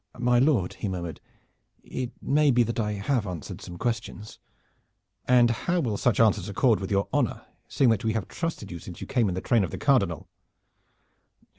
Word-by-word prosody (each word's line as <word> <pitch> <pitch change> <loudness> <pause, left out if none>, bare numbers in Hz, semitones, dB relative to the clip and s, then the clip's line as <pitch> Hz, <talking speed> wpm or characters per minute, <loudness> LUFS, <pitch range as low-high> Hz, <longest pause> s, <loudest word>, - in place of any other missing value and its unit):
"My 120 0 +3
lord," 125 - +2
he - - -5
murmured, 85 -3 -5 0.6
"it 130 -1 -5
may 150 +1 +3
be 120 -2 +4
that 115 +1 -3
I 105 -1 0
have 105 +2 -1
answered 85 -6 -6
some 85 - -9
questions." 110 -1 -4 0.9
"And 120 -2 +5
how 175 +10 -1
will 115 -10 -1
such 120 +3 +1
answers 105 -3 +3
accord 110 +3 +2
with 95 - -5
your 100 0 +1
honor, - - 0 0.2
seeing 130 -4 +3
that 110 - 0
we 110 -1 0
have 110 -4 -2
trusted 165 - -4
you 85 - -6
since 90 +1 -10
you - - -6
came 120 -6 +1
in 90 - -3
the 95 - -3
train 115 -4 +2
of 90 - -2
the - - -6
Cardinal?" 100 - +1
110 Hz, 190 wpm, -26 LUFS, 100-125 Hz, 0.9 s, And